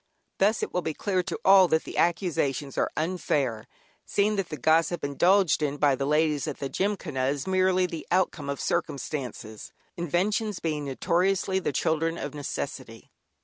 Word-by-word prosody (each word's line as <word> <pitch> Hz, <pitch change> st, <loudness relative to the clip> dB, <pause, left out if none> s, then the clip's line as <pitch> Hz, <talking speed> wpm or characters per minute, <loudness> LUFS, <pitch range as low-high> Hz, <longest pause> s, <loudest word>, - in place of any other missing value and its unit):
Thus 210 Hz, +3 st, +2 dB
it -, -, -4 dB
will 180 Hz, -, 0 dB
be 160 Hz, -3 st, -3 dB
clear 190 Hz, -3 st, 0 dB
to 180 Hz, -1 st, -4 dB
all 190 Hz, -1 st, +7 dB
that 160 Hz, -1 st, +1 dB
the -, -, -8 dB
accusations 150 Hz, -6 st, 0 dB
are -, -, +1 dB
unfair, 150 Hz, -9 st, -1 dB, 0.4 s
seeing 210 Hz, +1 st, +1 dB
that 195 Hz, -3 st, -2 dB
the 155 Hz, -, -5 dB
gossip 160 Hz, +5 st, +2 dB
indulged 175 Hz, +5 st, +3 dB
in 145 Hz, -1 st, -1 dB
by 145 Hz, -1 st, +3 dB
the 135 Hz, +1 st, -2 dB
ladies 150 Hz, -1 st, +1 dB
at -, -, -4 dB
the 140 Hz, -, -4 dB
Gymkhana 185 Hz, -10 st, -1 dB
is 140 Hz, 0 st, -2 dB
merely 185 Hz, -1 st, +2 dB
the 165 Hz, -3 st, -6 dB
outcome 175 Hz, -5 st, 0 dB
of 140 Hz, -, -3 dB
circumstances, 125 Hz, -7 st, -4 dB, 0.2 s
inventions 190 Hz, +5 st, -1 dB
being 150 Hz, -3 st, -2 dB
notoriously 185 Hz, +7 st, +1 dB
the 180 Hz, -, -2 dB
children 160 Hz, +4 st, 0 dB
of -, -, -5 dB
necessity. 145 Hz, -1 st, -6 dB
165 Hz, 165 wpm, -27 LUFS, 145-185 Hz, 0.4 s, all